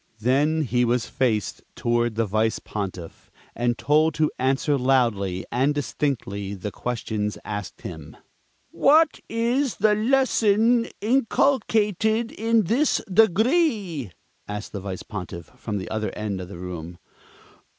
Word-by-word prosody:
Then 145 +7 +2
he 125 -2 +1
was 120 0 +1
faced 110 -6 -1
toward 120 -1 0
the 115 0 +1
Vice 110 +2 +1
Pontiff, 95 -5 -6 0.2
and 120 0 0
told 155 +1 +2
to 155 -1 +1
answer 135 +3 +1
loudly 115 -9 +1
and 135 +5 +1
distinctly 105 -9 -2
the 100 +2 -5
questions 110 -3 -3
asked 105 -3 -6
him. 80 -4 -9 0.5
"What 310 +2 +4
is 235 +1 0
the 210 +4 +3
lesson 230 -1 +3
inculcated 225 -2 +1
in 225 0 +2
this 250 - +2
Degree?" 215 - +2 0.4
asked 105 +1 -6
the 100 - -5
Vice 95 -1 -6
Pontiff 90 -5 -7
from 105 -2 -4
the 95 - -6
other 110 -1 -1
end 105 -3 -3
of 90 - -7
the 90 - -9
room. 85 -1 -7
130 Hz, 130 wpm, -24 LUFS, -, 0.5 s, What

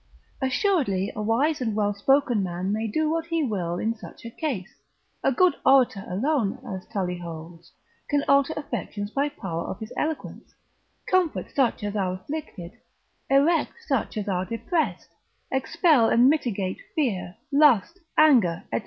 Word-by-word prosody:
Assuredly 260 - +1
a 215 - -3
wise 260 +8 +1
and 225 -4 -1
well 205 -1 +1
spoken 245 +1 +2
man 185 +1 -2
may 220 +1 -1
do 310 +9 0
what 325 +1 -1
he 330 -2 0
will 180 -8 -2
in 220 +4 0
such 230 - -13
a 230 - -6
case; 235 - -4 0.5
a - - +3
good 350 +6 +4
orator 255 -7 +4
alone, 225 +2 0
as 190 -2 -6
Tully 180 -3 -3
holds, 165 0 -9 0.4
can 290 -1 +2
alter 280 +1 +4
affections 210 -8 -4
by 280 +3 0
power 180 - -5
of - - -5
his 220 +1 -8
eloquence, 315 0 -4 0.5
comfort 370 -4 +1
such 255 -5 +1
as 205 0 -3
are 190 -3 0
afflicted, 185 - -7 0.6
erect 285 +5 +3
such 270 -6 -1
as 210 -1 -3
are 185 -2 0
depressed, 305 - -2 0.4
expel 280 -2 +3
and 240 +2 +5
mitigate 210 -11 -1 0.2
fear, 205 - -1 0.2
lust, 295 - +4 0.2
anger, 240 - +5
&c. 115 - +2
230 Hz, 155 wpm, -25 LUFS, 195-290 Hz, 0.6 s, and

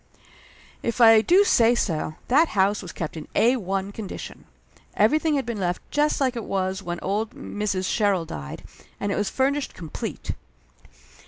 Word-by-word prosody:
If 235 +1 -2
I 225 -2 +8
do 360 - +5
say 240 - +4
so, 155 -8 -1
that 300 +6 +4
house 195 +2 +3
was 180 - -8
kept 160 -1 -5
in 155 - -7
Ai 240 +3 +4 0.4
condition. 205 -2 -8 0.5
Everything 300 +8 +3
had 275 - -1
been 235 -3 -4
left 180 -1 -1
just 295 +1 +1
like 260 -3 +1
it 230 - -4
was 190 0 -2
when 175 -2 -4
old 210 +3 -2
Mrs. 200 -3 -3
Sherrill 200 -6 +1
died, 70 - -7 0.4
and 200 - -1
it - - 0
was 205 -1 0
furnished 275 +1 0
complete. 165 -4 -5
210 Hz, 160 wpm, -24 LUFS, 185-250 Hz, 0.5 s, I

